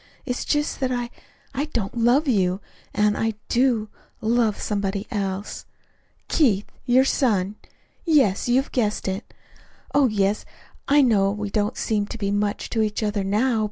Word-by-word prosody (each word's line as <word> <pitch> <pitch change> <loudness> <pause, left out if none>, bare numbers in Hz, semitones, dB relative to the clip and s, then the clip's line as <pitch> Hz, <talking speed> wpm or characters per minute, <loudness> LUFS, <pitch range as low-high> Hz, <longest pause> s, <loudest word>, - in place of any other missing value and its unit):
It's 250 -2 -3
just 295 0 0
that 260 -1 0
I 245 -1 -2 0.4
I 275 +2 -1
don't 230 -10 -3
love 240 +6 +3
you 190 -6 +2 0.3
and 210 0 +2
I 225 -1 -1
do 240 -3 +2 0.3
love 225 -1 +1
somebody 200 -1 -2
else 200 -2 -3 0.6
Keith, 215 - +2 0.2
your 255 +2 +5
son 205 -8 +1 0.5
yes, 270 - +3
you 240 - +4
have 270 +1 +1
guessed 215 -6 0
it. 190 +3 -4 0.6
Oh, 285 -2 +5
yes, 205 -1 +1 0.4
I 290 0 +5
know 205 -6 +3
we 205 0 -4
don't 210 0 0
seem 210 -2 0
to 230 - -6
be 200 -2 -1
much 205 0 -1
to 225 - +1
each 215 0 -1
other, 205 -1 0
now. 220 +5 +1
215 Hz, 160 wpm, -23 LUFS, 205-250 Hz, 0.6 s, your